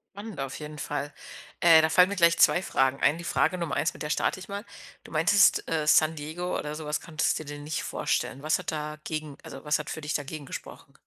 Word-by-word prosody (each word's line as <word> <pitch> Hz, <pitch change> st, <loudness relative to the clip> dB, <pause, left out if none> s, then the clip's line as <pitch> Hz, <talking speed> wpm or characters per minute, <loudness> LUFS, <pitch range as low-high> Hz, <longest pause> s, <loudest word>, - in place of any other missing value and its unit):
Spannend 205 Hz, -5 st, -8 dB
auf 135 Hz, -1 st, -4 dB
jeden 150 Hz, 0 st, -8 dB
Fall. 145 Hz, -1 st, -4 dB, 0.5 s
Äh, 165 Hz, -2 st, +7 dB
da 160 Hz, -, +2 dB
fallen 180 Hz, +3 st, +6 dB
mir 200 Hz, -, -3 dB
gleich 170 Hz, -2 st, +4 dB
2 175 Hz, -, +5 dB
Fragen 135 Hz, -6 st, +1 dB
ein. 140 Hz, +4 st, +3 dB
Die 170 Hz, -, -8 dB
Frage 185 Hz, -, +1 dB
Nummer 170 Hz, -4 st, -3 dB
eins 155 Hz, +4 st, 0 dB
mit -, -, -7 dB
der 150 Hz, -, -3 dB
starte 185 Hz, -, 0 dB
ich 185 Hz, -, -10 dB
mal. 200 Hz, +1 st, -5 dB, 0.4 s
Du -, -, -14 dB
meintest, -, -, +4 dB
äh, 155 Hz, -2 st, -1 dB
San 155 Hz, +1 st, +5 dB
Diego 160 Hz, +4 st, -4 dB
oder 150 Hz, 0 st, -4 dB
sowas 150 Hz, -1 st, -3 dB
könntest 155 Hz, -2 st, -1 dB
du 155 Hz, -, -8 dB
dir 145 Hz, 0 st, -7 dB
nicht 145 Hz, 0 st, -4 dB
vorstellen. 135 Hz, -, -2 dB
Was 155 Hz, +3 st, +1 dB
hat 180 Hz, -, -4 dB
dagegen, 150 Hz, -1 st, -5 dB
also, 135 Hz, -, -10 dB
was 150 Hz, +1 st, +1 dB
hat 150 Hz, -, -6 dB
für 155 Hz, -, -5 dB
dich 150 Hz, 0 st, -3 dB
dagegen 145 Hz, +1 st, -4 dB
gesprochen? -, -, -9 dB
155 Hz, 235 wpm, -27 LUFS, 150-170 Hz, 0.5 s, Äh